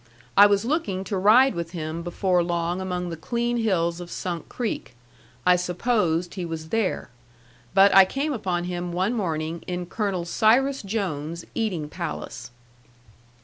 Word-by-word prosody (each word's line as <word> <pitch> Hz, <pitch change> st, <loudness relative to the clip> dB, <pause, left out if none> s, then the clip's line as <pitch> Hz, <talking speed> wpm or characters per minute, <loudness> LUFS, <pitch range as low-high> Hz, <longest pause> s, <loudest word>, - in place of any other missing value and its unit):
I 205 Hz, +1 st, +9 dB
was 200 Hz, +1 st, +1 dB
looking 225 Hz, -, -1 dB
to 200 Hz, -, -3 dB
ride 220 Hz, +8 st, +5 dB
with 170 Hz, -1 st, -5 dB
him 160 Hz, 0 st, -4 dB
before 180 Hz, +1 st, +1 dB
long 170 Hz, +1 st, -1 dB
among 180 Hz, -2 st, -3 dB
the -, -, -4 dB
clean 235 Hz, +8 st, -1 dB
hills 175 Hz, -6 st, 0 dB
of 175 Hz, -, -8 dB
Sunk 175 Hz, -2 st, -5 dB
Creek. 230 Hz, -, -4 dB, 0.5 s
I 180 Hz, 0 st, +6 dB
supposed 180 Hz, -2 st, 0 dB
he 185 Hz, -, -4 dB
was 160 Hz, -1 st, -5 dB
there. 225 Hz, -, -1 dB, 0.6 s
But 195 Hz, +1 st, +7 dB
I 195 Hz, -1 st, +9 dB
came 280 Hz, +9 st, -2 dB
upon 180 Hz, -7 st, -2 dB
him 175 Hz, 0 st, -4 dB
one 185 Hz, +6 st, 0 dB
morning 165 Hz, -6 st, -2 dB
in 180 Hz, 0 st, -3 dB
Colonel 190 Hz, -2 st, -2 dB
Cyrus 250 Hz, +9 st, +3 dB
Jones's 170 Hz, -6 st, -3 dB
eating 190 Hz, -10 st, -2 dB
palace. 150 Hz, -, -6 dB
180 Hz, 150 wpm, -25 LUFS, 170-215 Hz, 0.6 s, I